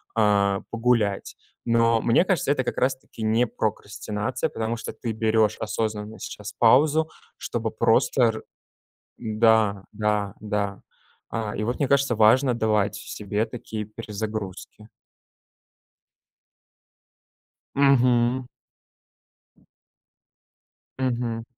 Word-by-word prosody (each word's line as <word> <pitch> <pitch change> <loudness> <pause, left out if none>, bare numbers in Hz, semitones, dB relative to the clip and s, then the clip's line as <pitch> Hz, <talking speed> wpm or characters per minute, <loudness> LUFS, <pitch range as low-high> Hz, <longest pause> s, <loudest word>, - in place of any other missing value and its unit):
а, 100 -2 +3
погулять. 115 -4 0 0.3
Но 115 -1 +3
мне 120 +9 +4
кажется, 180 -7 +1
это 130 -3 +1
как - - -4
раз-таки 130 -3 -2
не 110 +3 +3
прокрастинация, 105 +3 -3
потому 115 +1 -3
что 115 - -6
ты 115 - -4
берешь 110 -1 +1
осознанно 110 0 -3
сейчас 105 +1 -7
паузу, 150 +7 +4 0.3
чтобы - - -3
просто - - +2
р 110 -1 +1 0.8
м-да 110 -3 +2
да 105 -1 -1
да. 105 -2 -2 0.5
А, 110 -2 -3
и - - -2
вот 120 +3 -1
мне 145 - +1
кажется, 140 -4 +2
важно 125 +4 +5
давать 105 -3 +1
себе 105 +1 -3
такие 110 -2 -6
перезагрузки. 105 -1 -6 2.9
Мгм. 125 -2 +3 2.5
Мгм. 120 -3 -2
110 Hz, 95 wpm, -24 LUFS, 105-120 Hz, 2.9 s, важно